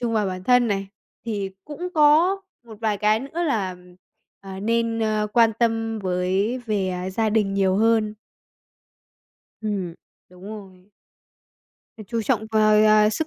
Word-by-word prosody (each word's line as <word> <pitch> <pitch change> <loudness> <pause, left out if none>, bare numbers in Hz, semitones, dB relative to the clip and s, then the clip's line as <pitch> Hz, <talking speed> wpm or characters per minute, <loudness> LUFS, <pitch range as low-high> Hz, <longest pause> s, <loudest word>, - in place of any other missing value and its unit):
trung 235 -2 -1
vào 210 -2 +1
bản 185 0 -5
thân 245 0 +4
này, 195 -1 -2 0.4
thì 200 -3 -3
cũng 325 +4 -6
có 315 +5 +5 0.3
một 220 -2 -13
vài 215 -2 0
cái 215 +1 +2
nữa 320 +6 -4
là, 200 - -1 0.6
à, 195 -1 -8
nên, 230 +1 0
a, 215 -1 0
quan 225 +1 +3
tâm 225 -1 0
với 190 +5 -1
về, 205 -4 0
à, 180 +1 -4
gia 220 +3 0
đình 205 -2 +1
nhiều 190 -1 +2
hơn. 220 -1 +2 1.5
Ừm, 200 -6 -3 0.3
đúng 180 0 -17
rồi. 195 -2 -11 1.1
Phải 215 - -10
chú 230 -1 -2
trọng 220 -2 0
vào, 215 -1 +4
à, 215 0 +5
sức 315 +8 -2
215 Hz, 155 wpm, -23 LUFS, 195-230 Hz, 1.5 s, có